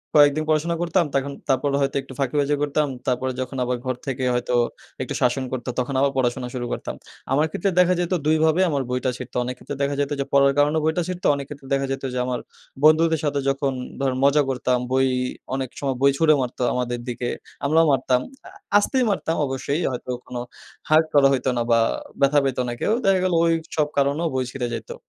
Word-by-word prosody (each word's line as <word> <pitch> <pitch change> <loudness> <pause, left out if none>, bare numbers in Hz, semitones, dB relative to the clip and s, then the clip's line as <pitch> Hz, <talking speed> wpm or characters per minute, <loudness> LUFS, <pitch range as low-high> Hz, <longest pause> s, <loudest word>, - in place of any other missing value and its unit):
কয়েকদিন 145 +1 +5
পড়াশোনা 155 +2 +1
করতাম, 175 0 +2
তখন 140 0 0 0.2
তারপর 135 +2 +2
হয়তো 135 0 0
একটু 135 - -12
ফাঁকিবাজি 140 +2 +1
করতাম। 145 +1 +1 0.2
তারপরে 130 +1 0
যখন 130 +1 -5
আবার 125 0 -1
ঘর 130 -1 -1
থেকে 130 -1 -2
হয়তো 120 0 -1 0.5
একটু - - -3
শাসন 125 +2 +2
করতো, 130 -1 -4
তখন 125 +2 -2
আবার 140 0 +3
পড়াশোনা 125 0 0
শুরু 125 -2 -3
করতাম। - - -5 0.4
আমার 145 +3 +3
ক্ষেত্রে 195 +5 0
দেখা 180 0 +5
যাইতো 175 +1 0
২ 155 +1 +4
ভাবে 160 +3 +3
আমার 140 -3 0
বইটা 125 +1 0
ছিঁড়তো। 125 -1 -9
অনেক 125 +1 -4
ক্ষেত্রে 145 - -7
দেখা 140 0 0
যাইতো 145 0 0
যে - - -2
পড়ার 140 0 +5
কারণেও 150 +2 +3
বইটা 160 +3 +1
ছিড়তো, 185 -1 -2
অনেক 140 -1 -5
ক্ষেত্রে 140 -2 -10
দেখা 135 0 +1
যাইতো 135 0 -3
যে 125 - -1
আমার 125 -1 -2 0.4
বন্ধুদের 160 +1 +5
সাথে 145 -1 0
যখন 135 0 0 0.3
ধরেন 135 -2 0
মজা 145 +2 +5
করতাম, 125 -1 +1
বই 130 0 +3 0.5
অনেক 135 -2 -3
সময় 135 -2 -1
বই 140 0 +6
ছুঁড়ে 155 0 +5
মারতো 125 0 -4
আমাদের 120 -1 -2
দিকে, 120 0 -3 0.4
আমরাও 160 +3 +4
মারতাম। 130 -2 +2 0.3
আ - - -10 0.3
আস্তেই 255 +5 +2
মারতাম 165 -5 -1
অবশ্যই, 140 +4 -2
হয়তো 125 0 -5
কোনো 125 - -6 0.5
hurt 155 +1 +5
করা 140 -2 +6
হইতো 130 0 0
না - - +1
বা 115 - +5 0.4
ব্যথা 140 +1 +5
পাইতো 135 -2 0
না - - -3
কেউ। - - +2
দেখা 195 -1 +4
গেলো 185 -2 +1
ওইসব 160 -2 0
কারণেও 140 +4 +2
বই 130 - +1
ছিড়ে 125 -2 -3
যাইতো। - - -7
140 Hz, 205 wpm, -23 LUFS, 130-155 Hz, 0.5 s, বই